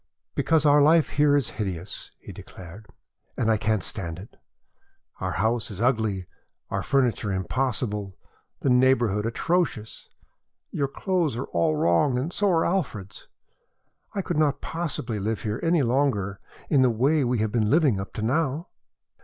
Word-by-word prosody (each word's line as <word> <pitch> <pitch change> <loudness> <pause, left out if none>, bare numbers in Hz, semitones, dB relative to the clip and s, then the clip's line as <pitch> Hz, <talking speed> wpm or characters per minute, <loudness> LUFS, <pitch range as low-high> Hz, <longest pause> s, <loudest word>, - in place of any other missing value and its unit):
"Because 160 -2 +2
our 145 0 +6
life 155 +2 +5
here 145 0 +3
is 140 -6 +1
hideous," 95 -2 -5
he - - -11
declared, 95 +4 -12 0.5
"and 115 -2 +2
I 110 - +3
can't 105 0 0
stand 85 -5 -5
it. 100 +5 -12 0.8
Our 95 -1 -2
house 110 +3 0
is 100 -3 -7
ugly, 110 -6 0 0.5
our - - -1
furniture 125 -6 +1
impossible, 105 0 -2 0.4
the 135 - +2
neighborhood 120 -5 +3
atrocious. 125 -3 -2 0.6
Your 140 - -1
clothes 165 -3 -1
are 130 - -3
all 85 -2 +1
wrong 85 - +2
and 150 +8 -3
so 205 -1 +1
are 165 -3 +2
Alfred's. 115 - -3 0.9
I 195 - -1
could 175 -3 -2
not 145 -2 +2
possibly 140 -9 -4
live 105 -1 -2
here 110 +1 -2
any 165 -3 +2
longer 115 -6 0 0.3
in 140 -4 +3
the 130 - +5
way 135 +6 +2
we 125 0 0
have 110 -1 0
been 110 -2 +1
living 145 - +3
up 95 - -6
to 110 - -4
now." 150 +6 0
120 Hz, 155 wpm, -25 LUFS, 105-145 Hz, 0.9 s, our